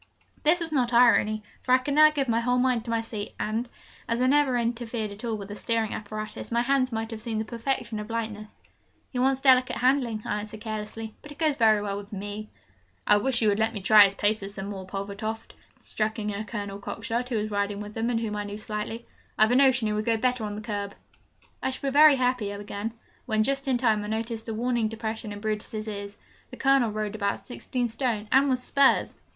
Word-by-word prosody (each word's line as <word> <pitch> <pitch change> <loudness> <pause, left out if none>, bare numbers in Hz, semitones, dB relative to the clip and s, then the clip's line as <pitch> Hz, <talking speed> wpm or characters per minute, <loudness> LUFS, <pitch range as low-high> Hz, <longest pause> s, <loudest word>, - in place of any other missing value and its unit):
This 320 +4 +4
was 330 -2 -4
not 250 -5 +1
irony, 220 -3 +4 0.2
for 255 - +1
I - - +8
could 260 +2 -3
now 305 +1 +8
give 285 -3 -1
my 230 -1 +2
whole 245 +1 +1
mind 250 -2 +1
to - - -6
my 230 0 +1
seat; 215 -2 -6
and, 225 +3 -2 0.4
as 230 +1 0
I 250 - +3
never 270 -1 +3
interfered 230 -2 -2
at 205 +3 -10
all 230 -2 -1
with 200 -1 -8
the 205 - -6
steering 225 -1 0
apparatus, 215 +1 -6
my 235 +1 +2
hands 260 0 +2
must 225 0 -3
have 220 -1 -6
seemed 225 -1 -3
the 220 - -2
perfection 235 -1 -2
of 210 +1 -7
lightness. 220 -2 -4 0.6
'He 250 - -2
wants 265 +1 +2
delicate 255 -2 +5
handling,' 245 -4 +1
I 210 - -1
answered 215 +1 -7
carelessly, 220 0 -5
'but 295 - -12
he 290 - -8
goes 305 0 +1
very 215 -3 +4
well 200 -1 -2
with 205 +1 -9
me.' 205 +1 -6 0.6
'I 210 - +5
wish 240 +2 +1
you 215 - +4
would 205 +1 +1
let 225 +1 +1
me 205 - -3
try 210 +1 +8
his 200 0 -1
paces 205 -1 0
some 195 0 -5
morning, 190 -2 -7
Pulvertoft,' 200 +3 -5 0.3
struck 215 0 -2
in 210 -1 -2
a 200 +2 -3
Colonel 205 -3 -5
Cockshott, 230 +4 -3
who 240 - 0
was 215 0 -2
riding 200 0 -1
with 210 0 -7
them, 225 +2 -1
and 235 -2 +1
whom 220 -2 -3
I 205 - -2
knew 205 0 -6
slightly: 215 +2 -4 0.3
'I've 215 +2 +5
a - - +4
notion 260 -3 +4
he 215 - 0
would 215 0 -1
go 230 -1 +2
better 250 0 0
on 205 0 -4
the 210 - -6
curb.' 205 -2 -4 0.7
'I - - 0
shall 270 +1 -3
be - - -8
very 300 0 +8
happy,' 250 -5 0
I 205 - -6
began, 205 +2 -5 0.3
when, 215 0 +2
just 275 +3 0
in 260 -2 +3
time, 220 -4 +2
I - - -5
noticed 225 +1 -3
a - - -2
warning 240 -1 0
depression 220 0 -4
in 205 0 -7
Brutus's 215 0 -3
ears. 200 -1 -6 0.3
The - - -10
Colonel 270 -4 +3
rode 215 -1 -3
about 200 -2 -2
sixteen 250 -1 -3
stone, 225 -2 -2
and 275 +2 +5
with 255 -1 0
spurs! 280 0 +3
225 Hz, 235 wpm, -26 LUFS, 210-250 Hz, 0.7 s, I